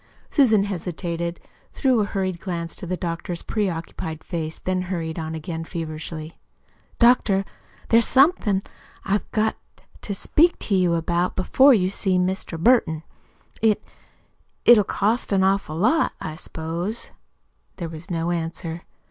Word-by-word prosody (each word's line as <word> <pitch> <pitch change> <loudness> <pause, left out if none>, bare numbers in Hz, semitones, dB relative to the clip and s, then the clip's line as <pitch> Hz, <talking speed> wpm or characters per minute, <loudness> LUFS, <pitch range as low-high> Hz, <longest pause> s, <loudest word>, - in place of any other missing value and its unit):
Susan 225 -9 +4
hesitated, 170 -3 -3 0.3
threw 260 -4 +2
a 210 - +2
hurried 190 -3 -2
glance 170 -3 -4
into 180 - -4
the 185 +1 -2
doctor's 170 0 -4
preoccupied 165 -5 -3
face, 160 -3 -4
then 185 0 -1
hurried 170 -3 -3
on 160 0 -4
again 160 +1 -5
feverishly. 160 -1 -6 0.6
"Doctor, 230 -5 +4 0.4
there's 230 0 +5
somethin' 260 - +3 0.4
I've 200 +1 0
got 220 0 0 0.2
to - - -25 0.2
to 200 - -4
speak 330 - +3
to 205 - -3
you 180 -2 +3
about 170 +2 0
before 265 +8 +5
you 185 -3 +1
see 190 -2 0
Mr. 180 -2 -1
Burton. 165 -7 +3 0.6
It 215 -2 +3 0.8
it - - +8
it'll 220 -3 +8
cost 215 +5 0
an 195 -1 +3
awful 190 -5 +1
lot, 225 - +2
I 155 - -5
s'pose." 170 +6 -4 0.7
There 170 - -4
was 165 +3 -10
no 170 0 -1
answer. 165 0 -3
180 Hz, 140 wpm, -23 LUFS, 165-210 Hz, 0.8 s, it